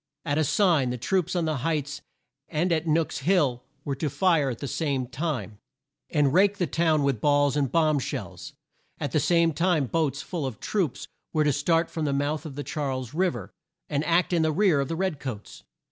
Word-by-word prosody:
At 145 +2 0
a - - +3
sign, 160 -4 +3
the 125 - -3
troops 180 +7 0
on 175 -2 +1
the 155 -2 -1
Heights 145 0 -2 0.5
and 170 +3 0
at 160 0 -1
Nook's 160 +1 +1
Hill 140 -6 +2 0.2
were 140 - -1
to 150 +1 -1
fire 150 -1 +2
at 120 - -4
the 140 - -5
same 140 -4 -1
time, 125 - -4 0.5
and 145 -3 +2
rake 200 +3 +4
the 180 - +1
town 160 0 +1
with 135 -6 0
balls 145 -1 +3
and 140 -4 0
bomb 155 -2 +3
shells. - - -6 0.5
At - - -3
the - - +2
same 170 -2 +3
time 165 -2 +2
boats 145 0 -1
full 165 -7 -3
of 115 -5 -7
troops 185 - -2 0.3
were 155 -2 +3
to 150 -1 +2
start 165 +4 +1
from 160 -3 -2
the 140 - 0
mouth 145 +3 -1
of 145 0 -6
Charles 130 -5 -3
Riv 180 +2 +1
er, - - -8 0.4
and 145 0 0
act 175 +2 +2
in 170 - +3
the 160 0 +2
rear 175 -2 +3
of 140 - 0
the 165 - -3
red 185 -4 -1
coats. 115 -7 -7
150 Hz, 205 wpm, -26 LUFS, 140-170 Hz, 0.5 s, rake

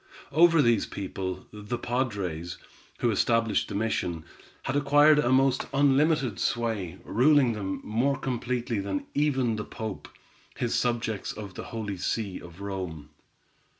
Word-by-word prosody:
Over 165 +1 +6
these 120 -3 +3
people, 95 -1 -5
the 105 +3 -4
padres, 100 -10 -2 0.4
who 120 - +3
established 115 +1 +2
the - - -6
mission, 90 -6 -1 0.4
had 135 - -2
acquired 145 +1 +5
a 125 -4 +2
most 130 0 +3
unlimited 140 0 +3
sway, 115 - -1
ruling 130 0 +4
them 95 -3 -4
more 130 +6 +1
completely 120 -3 -2
than 95 -1 -3
even 130 -6 +1
the 105 - -3
Pope 110 -2 -6 0.5
his 120 - -1
subjects 115 -4 -1
of 105 -3 -8
the - - -7
Holy 105 -4 -4
See 100 +1 -2
of 85 +2 -12
Rome. 90 -7 -5
115 Hz, 135 wpm, -27 LUFS, 100-135 Hz, 0.5 s, Over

